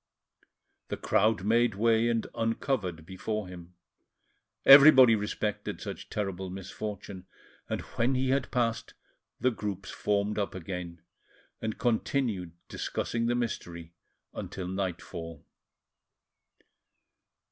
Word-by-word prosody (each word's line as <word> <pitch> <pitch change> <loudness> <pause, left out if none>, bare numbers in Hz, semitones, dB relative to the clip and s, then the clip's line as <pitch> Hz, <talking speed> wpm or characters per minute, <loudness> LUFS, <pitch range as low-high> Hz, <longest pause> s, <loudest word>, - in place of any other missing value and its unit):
The - - -4
crowd 105 -2 +2
made 115 +1 +3
way 115 +2 +3
and 115 -1 0
uncovered 115 - -2
before 105 +3 -4
him, 90 -1 -11 0.9
everybody 135 -3 +10
respected 105 0 -2
such - - -7
terrible 95 -3 -3
misfortune, 95 0 -7 0.4
and - - -2
when 125 +3 -1
he 130 0 0
had 135 -1 0
passed, 115 -2 -1 0.4
the 130 - +2
groups 100 -4 -5
formed 105 +1 0
up 100 - -2
again, 90 -2 -6 0.6
and 110 -1 -3
continued 115 -6 0
discussing 115 0 -2
the 120 - +1
mystery 85 -8 -4 0.4
until 95 -2 -6
nightfall. 85 -4 -5
105 Hz, 105 wpm, -29 LUFS, 95-115 Hz, 0.9 s, everybody